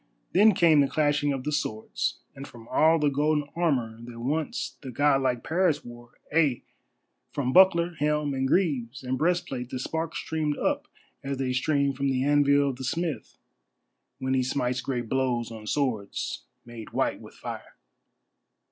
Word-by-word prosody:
Then 205 +2 +5
came 165 -4 +5
the 140 - +3
clashing 145 -1 +1
of 135 -2 -3
the 150 - -2
swords, 110 -7 -2
and 135 +1 -8
from 120 -4 -14
all 160 +1 +4
the 150 -2 +2
golden 150 +1 +1
armour 125 -10 0
that 120 -1 -10
once 150 +6 -2
the 135 - -7
god 135 +2 +2
like 125 -3 0
Paris 165 -3 +1
wore, 120 0 -12 0.2
ay, 150 -7 +3 0.7
from 130 -2 -2
buckler, 175 -2 +5
helm, 150 -1 +1
and 135 0 0
greaves, 135 -8 0
and 130 0 -1
breastplate 135 -5 -1
the 130 - -4
sparks 160 +5 -3
streamed 155 -2 -2
up - - -1 0.4
as 135 0 -3
they 130 -1 -1
stream 140 +1 +1
from 135 +1 -1
the 130 -1 0
anvil 145 0 +4
of 130 - -5
the 130 - -7
smith 150 -2 -3 0.8
when 130 -1 -2
he 130 - +3
smites 125 -1 -1
great 120 -3 -3
blows 125 -2 0
on 110 -1 -9
swords 115 -7 -2 0.2
made 120 -2 -10
white - - 0
with - - -13
fire. - - -8
140 Hz, 165 wpm, -27 LUFS, 125-150 Hz, 0.8 s, Then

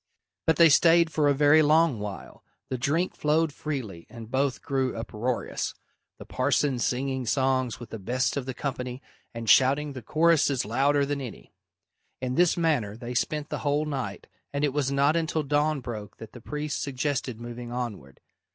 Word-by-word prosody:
But 160 - +4
they 165 0 +7
stayed 165 +2 +5
for 150 -2 +2
a - - +4
very 145 +2 +5
long 155 -4 +3
while. 105 -1 -7 0.3
The 130 - -1
drink 160 +8 0
flowed 155 0 +1
freely 125 - -5
and 115 -1 -10
both 135 0 0
grew 130 -3 -1
uproarious, 115 +2 -3 0.4
the - - -11
parson 135 0 0
singing 130 +1 -1
songs 130 0 +1
with 120 - -10
the 115 - -6
best 125 +6 -1
of 140 -2 -3
the 130 - -4
company 125 -2 -4 0.3
and 115 -1 -7
shouting 140 +6 +4
the 130 - -7
choruses 155 -1 +2
louder 140 +6 +2
than 140 0 -3
any. 125 -4 -9 0.7
In 125 -1 -2
this 175 +5 +3
manner 140 -11 0
they 120 +1 -6
spent 150 +4 -1
the - - -3
whole 145 +1 0
night, 140 -4 -4 0.3
and 140 +1 -2
it 145 -3 +1
was 140 -2 0
not 140 +3 +3
until 160 -1 0
dawn 145 +1 +1
broke 110 -5 -7
that 110 - -10
the 120 - -11
priest 150 +4 -4
suggested 135 -3 -2
moving 120 0 -7
onward. 115 - -6
135 Hz, 175 wpm, -27 LUFS, 120-150 Hz, 0.7 s, they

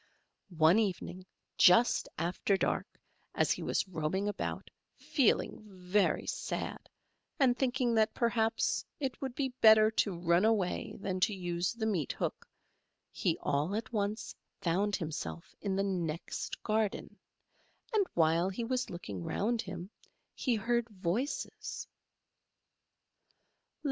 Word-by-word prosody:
] - - -52 0.2
One 180 +7 +6
evening, 185 -3 -2 0.3
just 205 +7 +6
after 180 +4 +1
dark, - - 0 0.5
as - - +2
he - - 0
was - - 0
roaming 185 +3 -1
about, 205 - -4 0.3
feeling 265 -7 +1
very 195 0 0
sad, - - -4 0.5
and 255 -3 +4
thinking 250 -1 +1
that, 220 -1 +2
perhaps, 230 -1 +1 0.2
it 270 -3 -3
would 265 -3 -4
be 270 -1 0
better 220 0 +8
to 200 -4 0
run 170 +1 +3
away 215 -5 +1
than 190 -1 -2
to 205 +2 +2
use 175 0 -1
the 230 -1 -3
meat 185 -10 0
hook, - - -3 0.6
he - - 0
all 145 +7 0
at 225 +2 -4
once 210 +1 -2 0.3
found 195 +4 +1
himself 165 +1 -5
in 195 -2 -1
the 195 - +1
next 175 -5 -3
garden, 215 -1 -1 0.7
and 410 -3 +3
while 165 +2 +3
he 215 +5 -4
was 255 +2 -1
looking 105 - -6
round 225 - 0
him, 185 -3 -7 0.4
he 250 -3 0
heard 235 +2 0
voices. 205 - -3
200 Hz, 130 wpm, -32 LUFS, 180-230 Hz, 0.7 s, better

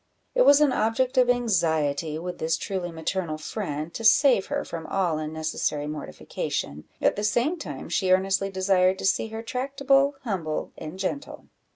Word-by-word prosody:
It - - +3
was 285 +1 +7
an 295 -3 +5
object 250 +4 +1
of 250 -1 +4
anxiety 160 -10 +1
with 175 +2 -6
this 160 +1 0
truly 180 -1 -4
maternal 165 0 -3
friend 155 -2 -5
to 225 - -6
save 235 -1 +5
her - - -2
from 165 -1 -6
all 175 -5 0
unnecessary 155 -1 -2
mortification, 145 - -5
at - - +2
the 205 - -3
same 240 +10 +1
time 145 - -7
she 185 +2 0
earnestly 195 +1 +2
desired 190 -1 +2
to - - -5
see 195 - +2
her 220 +1 -7
tractable, 275 +3 +1
humble, 175 -10 -3
and 155 +4 -8
gentle. 195 +9 -5
190 Hz, 165 wpm, -25 LUFS, 160-230 Hz, -, was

